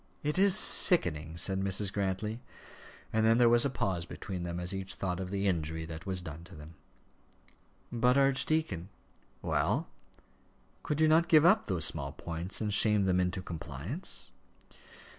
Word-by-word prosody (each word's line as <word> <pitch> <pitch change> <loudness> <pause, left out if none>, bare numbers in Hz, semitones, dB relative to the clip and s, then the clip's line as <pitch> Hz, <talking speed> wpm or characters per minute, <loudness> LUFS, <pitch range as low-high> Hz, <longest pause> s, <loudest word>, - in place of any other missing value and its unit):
"It 150 +4 -1
is 195 0 +6
sickening," 85 - +5
said 95 +2 -1
Mrs. 95 +1 +2
Grantly. 100 +3 -3 0.7
And 110 0 +1
then 115 +1 +4
there 120 -1 +4
was 120 +2 +4
a - - +1
pause 95 -8 -2
between 90 +1 -7
them 85 0 -5
as 90 +2 -2
each 95 0 -5
thought 90 -2 -3
of 95 -1 -5
the 100 +1 -2
injury 80 -3 -2
that 80 +2 -9
was 95 -2 -3
done 80 +1 -9
to 90 +1 -14
them. 75 +2 -12 1.2
"But, 125 +2 +2
archdeacon 135 - 0 0.3
" - - -37
"Well?" - - -1 0.9
"Could 150 +1 -3
you 155 - +5
not 165 +3 +3
give 155 -3 +5
up 205 +5 +4
those 90 -5 -1
small 70 -4 -5
points 85 +3 -6
and 105 -1 -2
shame 105 -1 +3
them 90 -1 +1
into 90 +1 -2
compliance?" 85 - -6
95 Hz, 165 wpm, -30 LUFS, 85-120 Hz, 1.2 s, is